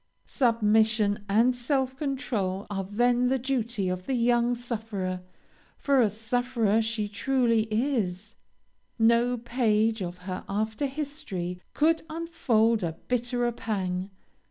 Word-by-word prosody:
"Submission 220 -3 +2
and 230 +5 +4
self 260 +1 0
control 225 -9 -2
are 195 -1 -2
then 240 +5 +2
the 265 +1 +2
duty 240 -6 -1
of 180 0 -3
the 265 - 0
young 240 0 +2
sufferer 215 -6 -4 0.6
for 275 -2 +3
a 220 - +4
sufferer 225 0 0
she 220 -1 -1
truly 230 +1 +1
is; 215 -4 -1 0.6
no 235 +2 +3
page 225 -2 +1
of 175 -1 -4
her 185 -1 -4
after 220 +7 -1
history 265 - -5
could 320 +2 +3
unfold 240 -9 +1
a 170 -2 -2 0.2
bitterer 245 0 0
pang. 190 -5 -3
230 Hz, 120 wpm, -27 LUFS, 205-250 Hz, 0.6 s, and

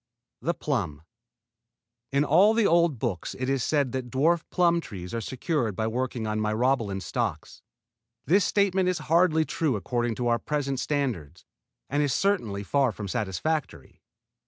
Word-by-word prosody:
THE 170 +2 -1
PLUM 85 - -2 1.1
In 140 +1 +2
all 195 +9 +5
the 225 -2 +3
old 170 -5 +3
books 110 -7 -3
it 130 - -3
is 135 -2 0
said 145 -5 +1
that 130 -2 -4
dwarf 160 +7 +2
plum 170 -2 +2
trees 90 - -8
are 115 - -2
secured 125 - -2
by 110 - -1
working 120 0 -2
on 110 0 -1
Myrobalan 110 -2 0
stocks. 105 - -3 0.6
This 190 +5 +4
statement 190 -2 +2
is 180 - 0
hardly 160 0 +3
true 155 -6 0
according 120 +3 -1
to 120 +1 -2
our 120 0 +2
present 140 -3 -2
standards, 130 - -3 0.4
and 145 +2 0
is 145 -2 +1
certainly 115 - 0
far 135 +4 +2
from 100 0 -6
satisfactory. 110 - -3
130 Hz, 155 wpm, -26 LUFS, 110-160 Hz, 1.1 s, all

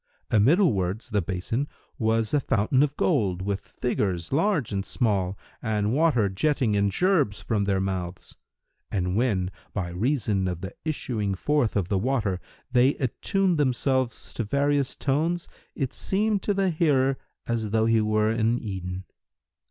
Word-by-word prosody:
Amiddlewards 110 - +2
the 105 -1 +2
basin 95 - -2 0.3
was 110 -1 +1
a 145 - +4
fountain 130 0 +2
of 145 -1 +1
gold, 100 - +1
with 100 0 -1
figures, 95 -6 -2
large 165 - +1
and 100 -1 -1
small, 100 -5 0 0.2
and 105 -1 0
water 145 -8 +3
jetting 115 +3 +1
in 100 0 +2
gerbes 150 - +2
from 105 -3 -1
their 100 -1 +1
mouths; 95 -2 -4 0.6
and 90 -2 -1
when, 100 -6 +1 0.2
by 90 -4 -2
reason 105 -1 0
of 90 -2 -3
the 95 -2 -6
issuing 115 -10 -2
forth 145 +2 +1
of 100 -4 +1
the 100 - +1
water, 110 -5 0 0.3
they 125 +3 +4
attuned 180 - 0
themselves 130 -2 0
to 115 - -2
various 140 +4 +1
tones, 160 +5 0 0.3
it 135 -5 -2
seemed 205 +1 0
to 205 - 0
the 195 -2 +2
hearer 135 -5 +2 0.3
as 115 -2 -1
though 110 +1 +2
he 115 -1 +3
were 110 0 +2
in 115 +1 +1
Eden. 95 -4 -5
115 Hz, 150 wpm, -26 LUFS, 100-140 Hz, 0.6 s, a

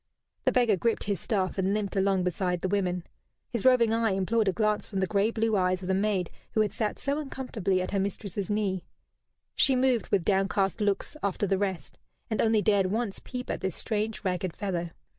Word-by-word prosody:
The - - +4
beggar 235 -5 +3
gripped 230 +5 0
his 200 -2 -1
staff 195 -3 -1
and 190 +2 +1
limped 205 -2 -2
along 195 -1 +2
beside 180 0 -1
the - - 0
women. 180 -3 0 0.5
His 235 -4 -1
roving 245 -3 +5
eye 225 -3 +2
implored 210 +3 +1
a - - +4
glance 215 +1 0
from 195 - -5
the 190 - +2
grey 200 +2 +2
blue 225 -1 0
eyes 185 -1 +1
of - - -5
the 190 - +1
maid 195 -2 0 0.2
who 220 - +3
had 210 -2 0
sat 210 0 -1
so 280 +1 -1
uncomfortably 225 -10 -2
at - - -5
her 200 - +1
mistress's 200 0 -3
knee. 200 -3 0 0.7
She 265 - +4
moved, 250 -5 +2
with 185 -4 +1
downcast 195 +1 +1
looks, 205 +7 0
after 200 +1 0
the 195 -1 +1
rest, 190 -3 -3 0.3
and 215 - +1
only 220 -2 +3
dared 200 -3 +3
once 215 +1 -2
peep 250 0 -5
at - - -4
this 190 -2 -2
strange 215 -3 -2
ragged 180 -1 -1
fellow. 175 -4 -2
200 Hz, 205 wpm, -28 LUFS, 190-220 Hz, 0.7 s, roving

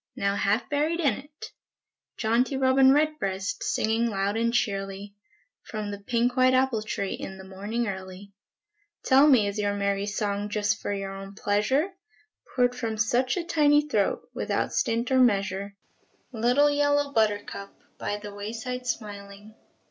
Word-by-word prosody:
Now 200 0 0
half 205 +4 +1
buried 305 +4 0
in 285 -8 +3
it! 290 +5 -10 0.7
Jaunty 240 +4 +1
robin 265 0 +5
redbreast, 270 -11 0
Singing 225 +2 +1
loud 200 0 -1
and 230 +1 +1
cheerly, 195 -2 -2 0.5
From 215 -2 -5
the 200 - -6
pink 240 +3 0
white 255 0 +4
apple 255 -4 +2
tree 200 -2 -3
In 190 - -7
the 190 - -10
morning 205 +5 -3
early, 190 +1 -7 0.7
Tell 270 +3 +6
me, 250 -8 +5
is 200 +1 -3
your 205 -1 0
merry 200 0 -1
song 205 0 -2
Just 210 +1 0
for - - -3
your 195 -1 -4
own 195 0 -9
pleasure, 215 - +1 0.6
Poured 245 -1 +3
from 225 -3 -3
such 245 - +1
a 355 - -1
tiny 295 -3 +3
throat, 210 -9 0
Without - - -2
stint 235 -2 0
or 260 - +4
measure? 200 -4 +1 0.6
Little 250 +5 +3
yellow 290 0 +1
buttercup, 205 -3 -1 0.2
By 205 - -2
the 205 -1 -9
way 205 +2 -6
side 250 +2 -5
smiling. 205 -2 -6
220 Hz, 155 wpm, -26 LUFS, 200-260 Hz, 0.7 s, Tell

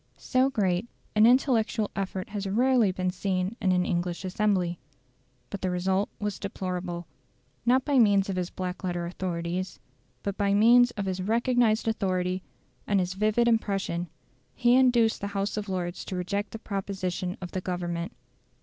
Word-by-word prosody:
So 260 +1 +2
great 195 -5 0 0.3
an 215 +1 +7
intellectual 235 -4 +2
effort 190 -1 -3
has 205 -1 -4
rarely 240 -1 +3
been 185 0 -1
seen 185 +2 -1
in 190 - +2
an 180 0 +2
English 175 0 -2
assembly. 185 -3 0 0.7
But 200 - -5
the 185 - 0
result 190 +3 0
was 210 -2 -3
deplorable. 180 -3 -4 0.6
Not 255 +2 +4
by 285 -3 +3
means 200 -4 +4
of 195 - -2
his 180 -1 -2
black 185 0 -5
letter 175 -2 -2
authorities, 175 +1 -3 0.4
but 200 -1 -3
by 200 -1 +2
means 240 +3 +6
of 200 - -2
his 190 -1 -2
recognised 230 +2 +2
authority 185 -4 0 0.5
and 200 -1 +3
his 180 0 -1
vivid 215 +4 +2
impression, 195 -6 0 0.5
he 240 -1 +4
induced 245 -3 +4
the 200 - -2
House 195 +1 -1
of 210 -1 -4
Lords 175 -1 -3
to 190 - -5
reject 200 +3 -2
the - - -7
proposition 190 -3 -3
of 180 -2 -7
the 185 - -3
Government. 175 +1 -3
195 Hz, 160 wpm, -27 LUFS, 180-215 Hz, 0.7 s, an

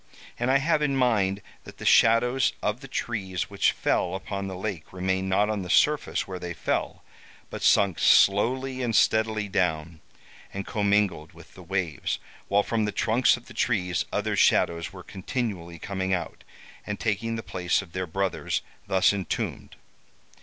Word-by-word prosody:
And 120 +1 0
I 135 - +5
have 150 +2 +1
in 145 -2 +1
mind 100 -6 +1 0.2
that - - -13
the - - -8
shadows 120 +3 +4
of 105 +3 -1
the 135 - -9
trees 100 -8 -3
which 100 - +2
fell 90 +1 0
upon 100 0 -4
the 95 - -5
lake 95 -4 -5
remained 95 +1 -1
not 100 +2 +3
on 105 -2 -2
the 90 - -7
surface 150 - +2
where 95 -1 -6
they 85 -1 -6
fell, - - -2 0.5
but - - -6
sunk 100 -4 +3
slowly 130 +6 +3
and 120 -3 -1
steadily 110 -2 +2
down, 80 -4 -1 0.5
and 100 0 -5
commingled 100 -6 0
with - - -16
the - - -13
waves, 95 -5 -2 0.3
while 100 +1 +3
from 110 -1 0
the 105 - -1
trunks 120 +4 +2
of 120 - -15
the 120 - -13
trees 95 -7 0
other - - -1
shadows 85 0 +2
were 95 -2 -11
continually 95 -4 -4
coming 95 +1 -2
out, 90 - -6 0.4
and 105 -1 -5
taking 115 +1 -1
the 115 - -5
place 90 0 -1
of 90 - -16
their 95 +1 -3
brothers 95 +3 -2 0.2
thus 95 +1 +3
entombed. 95 -4 -4
100 Hz, 165 wpm, -26 LUFS, 95-115 Hz, 0.5 s, I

